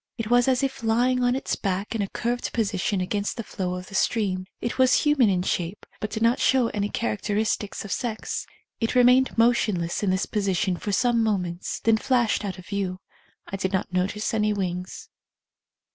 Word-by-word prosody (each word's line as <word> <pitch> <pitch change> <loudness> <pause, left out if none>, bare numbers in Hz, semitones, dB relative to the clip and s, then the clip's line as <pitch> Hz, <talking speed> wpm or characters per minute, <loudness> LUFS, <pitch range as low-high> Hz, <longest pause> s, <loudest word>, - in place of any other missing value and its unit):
It 225 0 -4
was 245 +1 +5
as 260 0 +2
if 270 -1 -2
lying 245 +3 +2
on 245 0 +3
its 270 - -2
back 195 +1 -2
in 225 - -1
a 200 - -1
curved 240 +1 -2
position 200 -3 0
against 200 +3 -2
the 230 - -3
flow 180 -3 -3
of 180 0 -6
the 195 - -14
stream. 190 -3 0
It 235 - -4
was 260 0 +5
human 295 -7 +4
in 180 -2 +1
shape, 180 +1 -2
but 215 - -3
did 220 +1 -3
not 235 +2 +3
show 255 -3 +3
any 205 -1 -2
characteristics 205 - -2
of 200 - -7
sex. 225 -3 -3 0.3
It 225 +2 -1
re 250 - +6
mained 255 +1 +4
motionless 215 -7 +2
in 205 - +1
this 185 +1 +1
position 195 -3 0
for 205 - -4
some 235 +3 +2
moments, 180 -5 -1
then 225 -1 +4
flashed 240 -3 +1
out 195 -3 -4
of 185 - -11
view. 190 -2 -3 0.5
I 195 - -5
did 190 0 -2
not 190 -1 -1
notice 195 +5 -1
any 210 -1 +2
wings. 180 -2 -4
210 Hz, 195 wpm, -25 LUFS, 190-235 Hz, 0.5 s, re